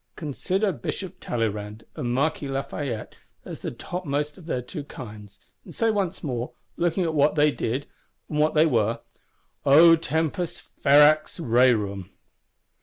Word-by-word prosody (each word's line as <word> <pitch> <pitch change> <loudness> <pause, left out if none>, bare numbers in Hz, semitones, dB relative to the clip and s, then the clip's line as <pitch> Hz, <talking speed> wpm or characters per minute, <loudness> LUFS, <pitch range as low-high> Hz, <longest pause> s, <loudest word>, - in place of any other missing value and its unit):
Consider 185 +7 -1
Bishop 190 0 -5
Talleyrand 105 -2 -3
and 120 - -2
Marquis 145 +3 0
Lafayette 135 -3 -4 0.3
as - - -7
the - - -3
topmost 150 -4 -3
of 175 -3 -14
their 125 -6 -2
two 150 +4 -7
kinds; 105 -8 -10 0.2
and - - -12
say 225 -1 +2
once 195 -4 -2
more, 125 -4 -3 0.2
looking 175 +2 0
at 165 -2 -1
what 150 0 +3
they 150 0 +4
did 130 +2 -2 0.4
and 150 - -2
what 155 +1 +2
they 155 +1 +6
were, 115 -6 +1 0.6
_O 165 +4 +8
Tempus 160 +2 -2 0.2
ferax 150 +3 +5
rerum! 115 - +2
145 Hz, 140 wpm, -25 LUFS, 120-165 Hz, 0.6 s, O